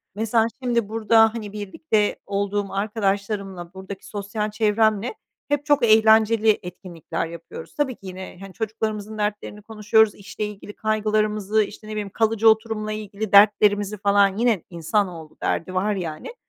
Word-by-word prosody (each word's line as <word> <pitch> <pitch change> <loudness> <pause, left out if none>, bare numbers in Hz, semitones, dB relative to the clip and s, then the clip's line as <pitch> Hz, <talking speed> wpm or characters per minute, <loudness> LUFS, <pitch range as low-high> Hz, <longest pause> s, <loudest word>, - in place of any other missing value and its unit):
Mesela 225 +1 +2 0.2
şimdi 235 -4 0
burada, 225 0 +4
hani, 210 -3 -6
birlikte 210 +1 -1
olduğum 200 0 -2
arkadaşlarımla, 200 -3 -2
buradaki 190 +1 -9
sosyal 210 +1 -4
çevremle 215 - +1 0.3
hep 290 -1 -1
çok 290 -4 +3
eğlenceli 220 0 +5
etkinlikler 170 -2 -6
yapıyoruz. 165 0 -10
Tabii 265 -5 -1
ki 195 - -13
yine, 185 -1 -8
hani, 195 -1 -10
çocuklarımızın 220 -1 -4
dertlerini 210 0 -3
konuşuyoruz, 220 0 +2
işle 210 +1 -6
ilgili 205 0 -9
kaygılarımızı, 215 -1 0
işte, 210 +1 -10
ne - - -7
bileyim, 210 -2 -4
kalıcı 225 +1 +3
oturumla 220 -1 0
ilgili 215 -1 -5
dertlerimizi 205 0 +5
falan. 200 0 +3
Yine 230 -7 +1
insanoğlu, 170 -2 -2
derdi 175 +3 -2
var 200 +3 0
yani. 170 - -6
210 Hz, 140 wpm, -23 LUFS, 200-220 Hz, 0.3 s, eğlenceli